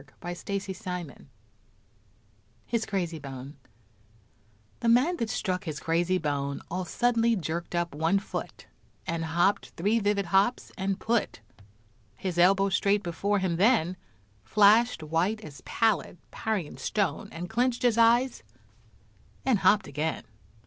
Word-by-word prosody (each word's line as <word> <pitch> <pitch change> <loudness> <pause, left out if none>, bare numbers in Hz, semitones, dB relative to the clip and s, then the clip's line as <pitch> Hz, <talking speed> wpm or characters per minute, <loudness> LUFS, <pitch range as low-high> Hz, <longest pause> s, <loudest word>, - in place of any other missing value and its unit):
His 190 - -5 2.1
Crazy 175 -5 -2
Bone 135 0 -8 1.2
The 235 - +1
man 270 +10 +4
that 230 - -2
struck 185 -4 -2
his 155 -3 -4
crazy 175 +3 +1
bone, 140 -3 -2
All 185 +1 -2
suddenly 235 +3 +2
jerked 170 -1 -4
up 175 -2 -1
one 160 +6 +2
foot 195 - -6 0.4
And 165 0 -2
hopped 175 +5 +1
three 210 +7 +2
vivid 205 -1 +1
hops, 195 +7 +1
and 195 +1 -2
put 230 - -1 0.7
His 175 +5 -3
elbow 195 +2 +5
straight 200 +2 +2
before 195 +4 0
him 185 -3 0
then 185 -4 +3 0.5
Flashed 210 - +4
white 170 +8 0
as 145 -10 -11
pallid 220 -5 0
Parian 205 -9 -3
stone, 205 -2 -1
And 175 +2 -6
clinched 240 +3 0
his 235 -2 +3
eyes, 240 +2 +4 1.0
and 255 -6 +3
hopped 200 +3 +4
again. 150 +3 -3
190 Hz, 120 wpm, -28 LUFS, 165-220 Hz, 2.1 s, elbow